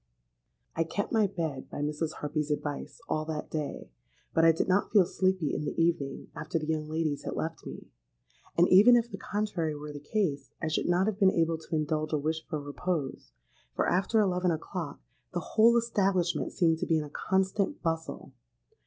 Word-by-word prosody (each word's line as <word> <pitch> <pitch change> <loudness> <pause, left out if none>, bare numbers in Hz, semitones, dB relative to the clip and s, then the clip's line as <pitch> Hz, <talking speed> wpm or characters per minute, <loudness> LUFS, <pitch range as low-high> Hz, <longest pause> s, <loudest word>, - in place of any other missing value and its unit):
"I 165 - +2
kept 200 +5 -3
my 220 -3 +3
bed, 160 -8 -4
by - - -5
Mrs. 150 +2 -2
Harpy's 150 0 -3
advice, 145 -1 -3
all 155 - 0
that 155 -1 -5
day; 150 - -4 0.4
but 165 - +3
I 165 - +8
did 160 - -1
not 185 +2 +2
feel 200 -4 +6
sleepy 185 -4 0
in - - -2
the 150 - -3
evening, 165 -5 0
after 155 +1 -2
the 155 - -3
young 155 -1 -2
ladies 155 -2 -1
had - - -4
left 160 0 -4
me;—and - - -4
even 210 +7 +8
if 235 0 +1
the 195 - -6
contrary 195 -8 -2
were 150 0 -7
the 145 - -7
case, 145 -4 -1
I 155 - -2
should 155 - 0
not 175 +2 +3
have 215 -1 -1
been 195 -2 +6
able 165 -2 +1
to 160 +1 -5
indulge 155 0 -1
a - - +3
wish 160 +2 -2
for 155 -3 -3
repose, 145 - -3 0.4
for - - +1
after 195 +5 +2
eleven 180 -3 +2
o'clock 165 -1 -4 0.3
the - - +2
whole 230 +2 +6
establishment 195 -6 +1
seemed 165 -3 +2
to - - -2
be 165 - +3
in 155 - -1
a 145 - -10
constant 190 +3 0
bustle. 165 -1 -3
165 Hz, 190 wpm, -29 LUFS, 150-190 Hz, 0.4 s, I